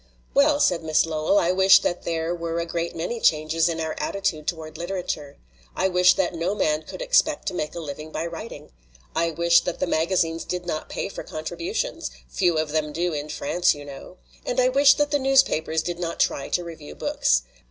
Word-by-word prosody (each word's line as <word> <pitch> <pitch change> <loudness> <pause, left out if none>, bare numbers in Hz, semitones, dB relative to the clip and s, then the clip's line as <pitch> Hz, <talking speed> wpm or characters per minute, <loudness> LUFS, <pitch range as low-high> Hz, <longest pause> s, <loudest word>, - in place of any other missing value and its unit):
"Well," 285 +1 +4
said 175 - +2
Miss 155 0 +2
Lowell, 160 +4 +1
"I 175 -2 +3
wish 190 +1 +6
that 175 - -2
there 165 0 -1
were 170 -1 -3
a 170 - -1
great 170 0 -3
many 175 +9 -3
changes 160 -1 +2
in 165 -1 -3
our 160 -1 -2
attitude 170 -6 -2
toward 160 -2 -4
literature. 170 -4 -4 0.4
I 190 - +1
wish 180 0 +5
that 185 -2 0
no 170 +4 -1
man 155 -6 +1
could - - -7
expect - - +2
to - - -9
make 155 -3 -3
a - - -4
living 155 0 -7
by 160 +2 -3
writing. 165 -2 -8 0.4
I 170 0 +1
wish 170 +1 +4
that 175 - -4
the - - +1
maga 170 +2 0
zines 165 -2 0
did 180 -1 -4
not 155 -3 -4
pay - - -3
for - - -7
contributions 160 - -4 0.2
few 160 - +1
of 155 -1 -1
them 155 -1 -1
do 170 +2 -1
in 150 0 -4
France, 175 +4 +1
you 145 0 -10
know. 140 +6 -10 0.3
And 245 - -1
I 255 0 +4
wish 275 +1 +6
that 295 0 0
the 290 - +2
newspapers 260 - +2
did 175 -1 -4
not 170 -1 -4
try 140 - 0
to 175 - 0
review 160 - -9
books. - - +1
170 Hz, 210 wpm, -24 LUFS, 155-180 Hz, 0.4 s, wish